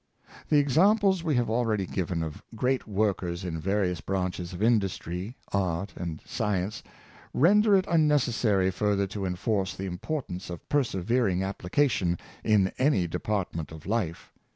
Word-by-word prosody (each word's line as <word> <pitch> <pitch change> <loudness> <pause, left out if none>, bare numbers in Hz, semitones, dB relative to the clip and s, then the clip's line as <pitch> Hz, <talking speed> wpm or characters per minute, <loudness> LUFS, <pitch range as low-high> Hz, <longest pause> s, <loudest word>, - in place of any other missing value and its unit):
The 150 - +5
examples 190 - +4
we 155 -4 +1
have 120 -1 +2
already 110 -3 0
given 90 -2 -2
of 80 -2 -6
great 125 +3 0
work 105 -2 +1
ers 85 0 -4
in 80 -2 -3
various 90 -1 0
branches 90 -1 -2
of 90 +3 -4
industry, 100 -2 0 0.2
art, 95 -1 -1
and 85 -3 -5
science, 105 -3 -2 0.5
render 205 - +5
it 190 -1 +3
unnecessary 120 - +2
further 100 +1 +1
to 95 0 -4
enforce 95 +1 -1
the 95 - -5
importance 95 - -4
of 85 -2 -8
persevering 115 -6 +1
application 95 -1 0 0.3
in 100 -3 +3
any 130 -9 +3
department 85 -2 -3
of 80 -1 -10
life. 100 -6 -2
100 Hz, 140 wpm, -28 LUFS, 90-125 Hz, 0.5 s, The